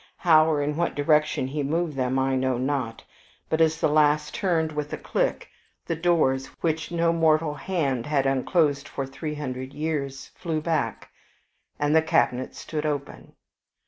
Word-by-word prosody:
How 160 -2 +5
or 145 -2 +1
in 150 +1 -2
what 170 0 0
direction 150 -1 +2
he 145 +3 -3
moved 160 +2 -1
them 130 0 0
I 135 0 +1
know 130 -1 0
not; 130 -3 -2 0.5
but 160 0 +1
as 160 0 +3
the - - +3
last 150 0 +2
turned 165 -5 0
with 150 -1 -4
a - - -2
click, - - -1 0.4
the 165 - -2
doors, 160 -6 +2
which 160 -2 -1
no 170 -1 +2
mortal 160 -2 +2
hand 145 -7 -2
had 145 -2 +1
unclosed 140 +1 +1
for 135 - -4
three 150 +3 -5
hundred 130 -2 -5
years, 145 -3 -3
flew 165 -4 -3
back, 155 -8 -2 0.7
and 145 +1 +1
the 160 - +6
cabinet 130 -5 +1
stood 155 -2 -4
open. 145 -2 -4
150 Hz, 165 wpm, -25 LUFS, 135-160 Hz, 0.7 s, the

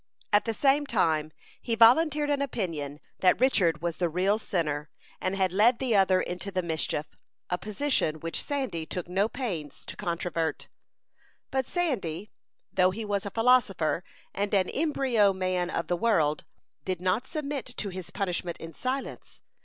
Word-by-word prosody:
At 205 - +5
the 225 - -1
same 280 +4 +3
time 160 - +1 0.3
he 230 - -1
volunteered 290 +6 +5
an 285 -1 +1
opinion 165 - -3 0.2
that 180 -1 +4
Richard 175 - +3
was 170 -2 -2
the 175 -2 +1
real 190 +6 +1
sinner, 150 -7 -2 0.3
and 185 +1 -1
had 190 -2 +1
led 225 +5 +5
the 250 -4 0
other 190 -1 +4
into 180 +2 -3
the 185 -1 -1
mischief 160 -2 -1 0.5
a 180 - 0
position 210 - 0
which 165 +2 -3
Sandy 260 - -3
took 180 -2 -4
no 190 +4 +1
pains 180 - -4
to - - -6
controvert. 170 -3 -2 0.8
But 265 -2 0
Sandy, 210 - -2 0.4
though 185 -1 +4
he 215 +4 -4
was 200 -1 -1
a - - -2
philosopher, 225 -8 +2 0.3
and 205 +1 0
an 185 -2 +2
embryo 260 -9 +2
man 185 -1 -1
of 170 - -2
the 175 - 0
world, 160 -9 +2 0.4
did 185 -2 -2
not 185 +8 0
submit 285 -5 -4
to 205 - -2
his 185 -2 -7
punishment 180 -3 -3
in 165 0 -9
silence. 260 - -4
190 Hz, 160 wpm, -28 LUFS, 170-240 Hz, 0.8 s, At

